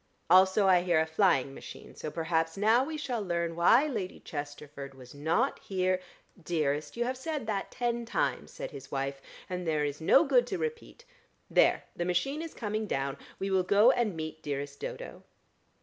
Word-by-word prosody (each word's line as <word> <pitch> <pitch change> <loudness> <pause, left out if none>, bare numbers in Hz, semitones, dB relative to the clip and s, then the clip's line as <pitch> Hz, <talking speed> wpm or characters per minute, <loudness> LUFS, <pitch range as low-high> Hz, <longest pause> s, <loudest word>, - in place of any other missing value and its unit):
Also 190 +2 +6
I 185 -2 +5
hear 175 -3 +2
a 160 - +2
flying 160 -5 +2
machine, - - -10
so - - -6
perhaps 165 +1 -1
now 220 +5 +4
we 310 +3 -4
shall 250 -6 -2
learn 170 -3 -1
why 230 - +5
Lady 215 -11 -4
Chesterford 145 -2 -7
was 125 -2 -13
not 160 - 0
here 185 -1 0 0.2
" 180 - -25
"Dearest, 155 +1 -1
you 240 - +1
have 255 +1 -1
said 290 0 -4
that 205 -3 -2
ten 240 -1 -1
times," - - -1
said - - -6
his 135 -2 -10
wife, 135 0 -3 0.3
"and 180 -1 -4
there 155 -2 +1
is 145 +2 -4
no 270 - +6
good 255 -5 +3
to - - -2
repeat. 465 +1 -5 0.5
There! - - +4
The 175 - -2
machine 270 - 0
is 330 -1 -7
coming 215 -1 -2
down. 135 -4 -1 0.2
We 195 0 -3
will 190 -1 +4
go 205 +6 +5
and 230 -8 0
meet 155 0 -5
dearest 140 0 -4
Dodo." - - -7
180 Hz, 185 wpm, -30 LUFS, 155-235 Hz, 0.5 s, Also